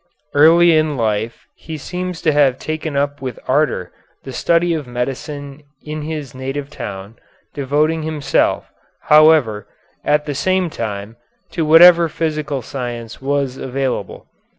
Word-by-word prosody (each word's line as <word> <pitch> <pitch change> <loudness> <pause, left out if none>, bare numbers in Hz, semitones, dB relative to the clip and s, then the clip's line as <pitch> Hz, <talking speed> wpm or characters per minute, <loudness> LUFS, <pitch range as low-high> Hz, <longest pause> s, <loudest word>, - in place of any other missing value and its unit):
Early 165 +3 +6
in 155 -2 +1
life 110 0 -2
he 160 -1 -8
seems 180 +3 -5
to 160 - +3
have 140 -3 +3
taken 155 -2 -4
up 145 0 -1
with 130 -3 -5
ardor - - 0 0.3
the 135 - -8
study 170 +5 +1
of 155 -5 -4
medicine 135 +3 -5 0.2
in 155 0 -5
his 150 -4 -5
native 135 +2 -5
town, 100 -4 -8 0.4
devoting 150 +3 0
himself, 155 -2 0 0.4
however, 150 -9 +5 0.4
at 150 0 +1
the 145 - -3
same 185 +4 0
time 105 -1 -5 0.3
to 165 -2 -1
whatever 170 +2 +8
of 160 - -7
physical 150 -4 -2
science 120 -2 -6
was 135 -1 -1
available. 130 -6 -4
145 Hz, 135 wpm, -18 LUFS, 130-155 Hz, 0.4 s, whatever